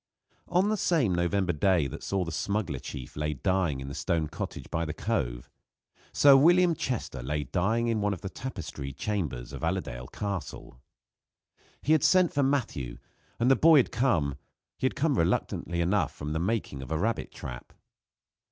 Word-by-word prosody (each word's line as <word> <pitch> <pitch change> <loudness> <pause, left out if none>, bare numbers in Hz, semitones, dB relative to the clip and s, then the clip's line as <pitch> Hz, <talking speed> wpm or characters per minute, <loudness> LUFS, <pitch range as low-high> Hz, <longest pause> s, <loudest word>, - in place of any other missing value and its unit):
On 185 +4 +2
the 215 - +1
same 155 - +2
November 90 +1 +1
day 85 0 +2
that 70 - -6
saw 95 -2 -1
the 85 - -5
smuggler 95 - -2
chief 65 - -8
lay 75 0 -2
dying 90 -3 0
in 65 - -6
the 70 - -6
stone 80 -1 -1
cottage - - -6
by 80 +1 0
the 80 0 -4
Cove, 60 - -2 0.6
Sir 140 -1 +7
William 175 +5 +5
Chester 125 - -3
lay 75 +4 -2
dying 95 - 0
in 115 -2 0
one 105 0 +1
of 95 - -4
the 95 - -4
tapestried 80 - -6
chambers 75 - -3
of - - -7
Allerdale - - -2
Castle. 100 -10 -5 1.0
He 150 - +1
had 155 -3 +4
sent 185 -2 +4
for 145 - +2
Matthew, 125 - -1 0.4
and 120 +3 +4
the - - +7
boy 160 +2 +6
had 130 - +3
come 85 - +1 0.4
had - - 0
come - - +1
reluctantly 85 0 0
enough 85 -4 +1
from 75 +1 -4
the 80 - -1
making 95 -7 -2
of 65 - -8
a 80 - 0
rabbit 115 +7 -1
trap. - - -8
95 Hz, 175 wpm, -28 LUFS, 75-115 Hz, 1.0 s, Sir